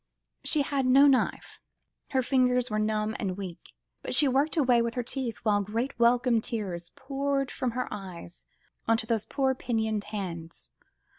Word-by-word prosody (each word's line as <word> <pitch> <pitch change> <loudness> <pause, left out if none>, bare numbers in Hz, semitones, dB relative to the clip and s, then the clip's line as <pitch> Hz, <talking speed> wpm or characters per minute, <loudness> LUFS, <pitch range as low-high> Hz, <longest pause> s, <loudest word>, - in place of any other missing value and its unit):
She 300 -3 +2
had 275 -2 -1
no 270 +3 +7
knife, 270 -3 +1 0.5
her 260 -2 +1
fingers 250 -2 +2
were 215 - 0
numb 215 0 0
and 190 -3 -2
weak, 185 -3 -8 0.3
but - - -1
she 295 - +6
worked 280 +5 +1
away 250 -5 +4
with 235 0 -2
her 245 - -1
teeth, 240 -3 -4
while 205 -2 +2
great 230 +6 -3
welcome 235 -1 +3
tears 185 -7 -4
poured 275 0 -2
from 255 - -2
her 250 +1 -2
eyes, 185 -4 -8 0.4
onto 225 0 +2
those 220 -2 0
poor, 270 -2 0
pinioned 220 -5 -2
hands. 175 -6 -6
235 Hz, 160 wpm, -28 LUFS, 210-265 Hz, 0.5 s, no